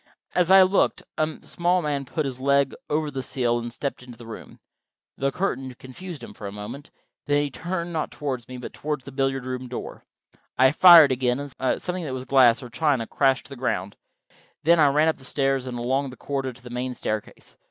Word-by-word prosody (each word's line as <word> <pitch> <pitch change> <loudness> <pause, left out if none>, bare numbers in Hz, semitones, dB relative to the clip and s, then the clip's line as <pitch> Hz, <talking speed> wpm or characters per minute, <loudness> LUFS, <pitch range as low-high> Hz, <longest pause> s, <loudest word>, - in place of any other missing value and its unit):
As 180 -1 +2
I 190 0 +9
looked 190 +1 +2
a 155 0 -1
small 175 +1 0
man 145 -2 -2
put 155 +3 -2
his 130 -1 -5
leg 140 0 +2 0.2
over 150 0 0
the 135 -1 -3
sill 120 -2 0
and 120 0 -5
stepped 140 +3 -4
into 125 -2 -12
the 120 - -12
room. 115 - -10 0.6
The 135 0 -1
curtain 135 -8 -3
confused 140 +4 -9
him - - -9
for 105 - -8
a - - -6
moment; 105 +8 -8 0.4
then 145 0 +3
he 145 - -3
turned, 175 +2 -4
not 155 -2 -1
toward 130 -5 -4
me, 130 - -7
but 125 - -8
toward 150 -2 -3
the 135 +2 -11
billiard 135 -1 -1
room 130 0 -4
door. 125 - -7 0.5
I 130 +1 +6
fired 165 -2 +9
again, 125 0 +1 0.2
and 130 - 0
something 180 0 -4
that 135 -5 -4
was 130 0 -6
glass 130 -3 +5
or 125 - -8
china 140 -4 +1
crashed 135 +1 +1
to - - -15
the 140 - -8
ground. 100 -6 -2 0.7
Then 170 +1 +5
I 150 - +6
ran 150 +3 +3
up 160 - +1
the 135 - -13
stairs 135 -1 0
and 125 -1 -4
along 130 +3 0
the 130 - -11
corridor 135 -2 -3
to 120 0 -18
the 125 - -10
main 125 +1 -3
staircase. 110 -3 -5
135 Hz, 215 wpm, -24 LUFS, 125-150 Hz, 0.7 s, I